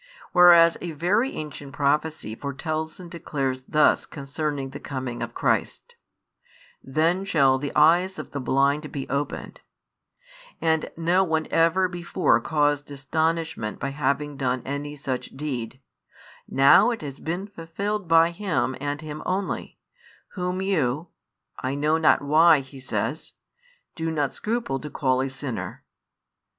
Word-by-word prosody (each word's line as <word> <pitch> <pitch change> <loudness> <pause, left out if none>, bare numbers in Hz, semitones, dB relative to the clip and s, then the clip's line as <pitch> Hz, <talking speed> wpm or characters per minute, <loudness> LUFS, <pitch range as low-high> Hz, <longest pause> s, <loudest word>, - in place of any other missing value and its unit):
Whereas 175 -2 +7
a 170 -2 -5
very 195 - +1
ancient 145 -2 -7
prophecy 145 -4 0
foretells 155 +6 -4
and 175 -2 -10
declares 135 -6 -3
thus 150 0 +3
concerning 140 -1 -4
the 140 - -7
coming 130 -3 -5
of - - -5
Christ: 485 - -1 0.9
Then 165 +7 +1
shall 135 -8 +3
the 145 0 -4
eyes 180 +4 +4
of - - -7
the 140 - -4
blind 140 +3 +1
be 135 -2 -5
opened, 140 +1 -4 1.0
and 160 -1 +1
no 175 +3 +3
one 160 -3 0
ever 165 +3 +3
before 175 -8 +1
caused 145 -1 0
astonishment 155 -4 -2
by 140 - -2
having 145 +1 -1
done 130 -2 -1
any 145 +2 -4
such 135 -2 -5
deed; 130 -4 -4 0.7
now 135 - +6
it 235 -8 -3
has 140 -2 -7
been 175 +4 -3
fulfilled 200 +2 -4
by 165 +1 +5
Him 170 -8 -1
and 145 +1 -3
Him 155 -1 -7
only, 190 +1 -3 0.5
Whom 180 0 -3
you 160 -4 0 0.5
(I 130 +2 -2
know 155 +3 +1
not 155 -2 +4
why, 155 +1 +5
he 135 0 -13
says) 130 - -3 0.6
do 165 0 -2
not 150 -4 -1
scruple 220 - -2
to 150 - -7
call 130 -3 +1
a 135 - -1
sinner. 135 -2 -6
150 Hz, 140 wpm, -25 LUFS, 140-170 Hz, 1.0 s, Whereas